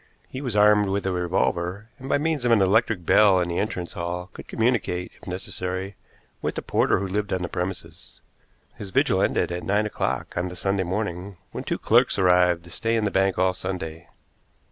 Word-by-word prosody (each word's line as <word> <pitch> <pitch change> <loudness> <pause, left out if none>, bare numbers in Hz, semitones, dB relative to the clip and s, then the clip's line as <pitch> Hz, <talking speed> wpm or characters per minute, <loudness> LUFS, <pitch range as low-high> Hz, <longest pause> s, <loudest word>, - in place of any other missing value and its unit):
He 130 - -7
was 125 -6 -3
armed 105 -1 +5
with 100 0 -1
a 95 - +1
revolver, 90 +3 -1
and 130 +1 -8
by - - +3
means 155 -2 -1
of 120 - +2
an 115 - +6
electric 100 -1 +2
bell 100 -1 +5
in 90 -1 -1
the 85 - -1
entrance 90 -4 -3
hall 90 +2 -4
could - - -11
communicate, 110 -6 0
if - - -13
necessary, 95 +1 -4 0.5
with - - -2
the - - -4
porter - - +2
who 95 - -2
lived 105 +2 -2
on 95 -1 -1
the - - -1
premises. 90 +1 -6 0.5
His 100 - -8
vigil - - +2
ended - - +1
at 90 0 -3
nine 105 +3 +1
o'clock 105 - -3
on 85 +1 -1
the 90 - -7
Sunday 95 +1 0
morning, 95 0 -4
when - - -5
two - - -1
clerks - - +3
arrived 90 -2 +4
to 85 - -13
stay 115 +5 -1
in 110 -2 +1
the 105 - 0
bank 95 0 +2
all 95 0 +2
Sunday. 85 -3 -6
95 Hz, 205 wpm, -24 LUFS, 90-105 Hz, 0.5 s, an